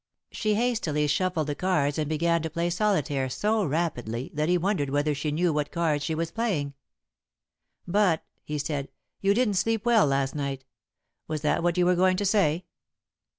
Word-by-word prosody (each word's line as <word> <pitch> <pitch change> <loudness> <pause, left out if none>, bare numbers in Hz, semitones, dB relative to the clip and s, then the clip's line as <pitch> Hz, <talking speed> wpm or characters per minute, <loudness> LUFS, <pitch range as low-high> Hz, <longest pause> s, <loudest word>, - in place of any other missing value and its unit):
She 215 -1 0
hastily 215 -11 0
shuffled 170 +1 0
the 145 - -2
cards 150 -4 0
and 150 -1 -1
began 170 +2 +1
to 160 - -3
play 170 +2 -1
solitaire 155 -9 0
so 210 - 0
rapidly 135 - -2
that 150 +2 0
he 180 - +4
wondered 175 -6 0
whether 145 +2 +1
she 150 +2 -2
knew 165 +2 +1
what 150 -1 -1
cards 160 -4 0
she 160 +2 -1
was 165 +1 -2
playing. 180 -12 -1 1.1
"But," 185 -3 +2 0.2
he 150 - -4
said, 145 -1 -3 0.3
"you 200 +1 +2
didn't 220 -5 +2
sleep 225 +2 0
well 230 -8 +5
last 135 -1 0
night. 140 -2 -4 0.6
Was 155 -2 -3
that 150 - +1
what 175 +1 +1
you 180 - +3
were 180 - +4
going 185 +1 +3
to 205 - -1
say?" 185 -4 +2
165 Hz, 180 wpm, -27 LUFS, 145-185 Hz, 1.1 s, well